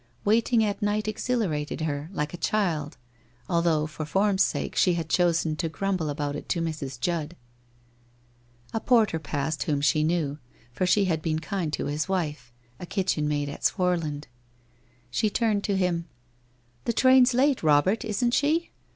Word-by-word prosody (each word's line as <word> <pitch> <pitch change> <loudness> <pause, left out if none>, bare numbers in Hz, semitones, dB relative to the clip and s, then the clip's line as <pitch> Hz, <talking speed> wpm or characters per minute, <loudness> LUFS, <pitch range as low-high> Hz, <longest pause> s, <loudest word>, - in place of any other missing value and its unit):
Wait 225 +4 +2
ing 230 -2 +4
at 205 0 -2
night 210 +1 0
exhilarated 210 -10 -2
her, 150 0 -3
like 150 -5 -3
a - - -5
child, 165 -6 -1 0.5
although 170 -3 +2
for 155 0 -6
form's 195 +5 +1
sake - - -2
she 180 -2 +3
had 165 -2 -3
chosen 165 -3 +2
to 165 +1 -2
grumble 185 -2 -2
about 145 0 -3
it - - -8
to 170 - 0
Mrs. 150 -6 -4
Judd. 170 +1 -2 1.4
A 225 - 0
porter 220 -9 +3
passed 145 0 -3
whom 145 -2 0
she 150 +2 +2
knew, 155 -3 0 0.3
for 180 +9 -1
she 200 +2 +4
had 165 -4 0
been 155 -1 -1
kind 170 0 -3
to - - -2
his 150 +5 -2
wife 150 -10 -2
— 120 +1 -33
a - - -6
kitchen 180 -6 0
maid 145 -1 -1
at 140 - -8
Swarland. 165 -6 0 0.8
She 215 - +1
turned 210 -1 0
to 200 -2 0
him: 175 -3 0 0.8
'The 235 - 0
train's 255 0 +5
late, 270 +1 +3
Robert, 160 +9 +3
isn't 240 +2 0
she? 315 +5 +1
170 Hz, 170 wpm, -26 LUFS, 150-205 Hz, 1.4 s, train's